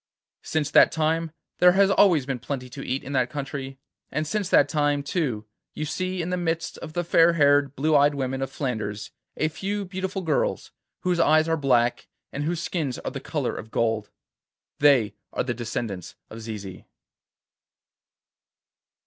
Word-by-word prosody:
Since 155 -2 -2
that - - +6
time 160 +1 0 0.3
there 180 0 +7
has 195 +1 +4
always 175 -10 +4
been 135 -2 -3
plenty 125 0 -5
to 135 - -7
eat 130 +2 -2
in 140 - -6
that 130 -2 +1
country, 135 -2 -5 0.3
and 155 - -2
since 200 +3 -2
that 145 - +5
time, 145 -2 +1
too, 140 - -2 0.3
you 155 - -3
see 185 +3 -2
in 175 - -4
the 180 - 0
midst 165 -1 -2
of 155 -2 -8
the 175 - -1
fair 170 0 +5
haired 145 -3 +3
blue 155 +3 +2
eyed 145 0 +4
women 135 -1 -2
of 135 - -2
Flanders 110 -7 -4 0.3
a 155 - +1
few 195 +6 -3
beautiful 190 +1 -4
girls, 155 -4 -1 0.3
whose 180 -1 0
eyes 155 0 +4
are 165 - +2
black 125 -5 +1 0.3
and 145 +1 -3
whose 170 +1 -2
skins 150 -8 -2
are - - -5
the - - -5
colour - - -3
of 110 - -8
gold. 110 -2 0 0.7
They 130 -8 +4 0.2
are - - 0
the 125 - -2
descendants 110 -5 -5 0.2
of 115 - -8
Zizi. 105 -4 -8
145 Hz, 170 wpm, -25 LUFS, 125-165 Hz, 0.7 s, there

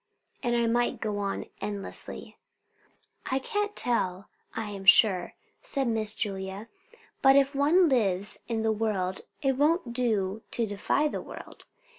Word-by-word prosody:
And 240 -2 0
I 235 - +2
might 240 +1 0
go 210 -2 -3
on 200 -1 -3 0.2
endlessly." 205 -1 -1 0.9
"I 260 - +1
can't 415 +8 -2
tell, 195 -6 -1 0.3
I 215 -2 -4
am 195 -1 -7
sure," 190 -2 +5 0.3
said 275 -3 +1
Miss 220 -2 0
Julia; 195 +1 -3 0.5
"but 270 0 +6
if 275 0 +3
one 310 +6 +4
lives 205 - +1
in 225 -2 -2
the 220 - +2
world, 205 -4 -2 0.2
it 270 -2 +1
won't 295 -3 +1
do 220 -4 -1
to 235 - 0
defy 210 +8 0
the - - -4
world. - - -11
225 Hz, 145 wpm, -27 LUFS, 200-265 Hz, 0.9 s, but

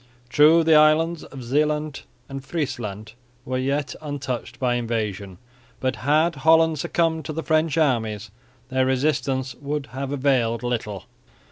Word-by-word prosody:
True 155 +4 +6
the 160 0 +4
islands 155 +2 +4
of 135 -3 -10
Zeeland 150 +3 0 0.3
and 135 0 -7
Friesland 115 - -4 0.3
were 130 0 -2
yet 140 +3 -1
untouched 140 -5 -5
by 125 -2 0
invasion, 105 -6 -3 0.4
but 130 0 -1
had 155 +3 +2
Holland 160 +2 +4
succumbed 160 +1 0
to 155 - -4
the 160 +1 -4
French 155 0 +1
armies 110 -8 0 0.4
their 130 0 +1
resistance 130 -1 0
would 145 0 -5
have 135 +1 -4
availed 130 -5 +1
little. 110 -6 -3
135 Hz, 135 wpm, -23 LUFS, 120-155 Hz, 0.4 s, True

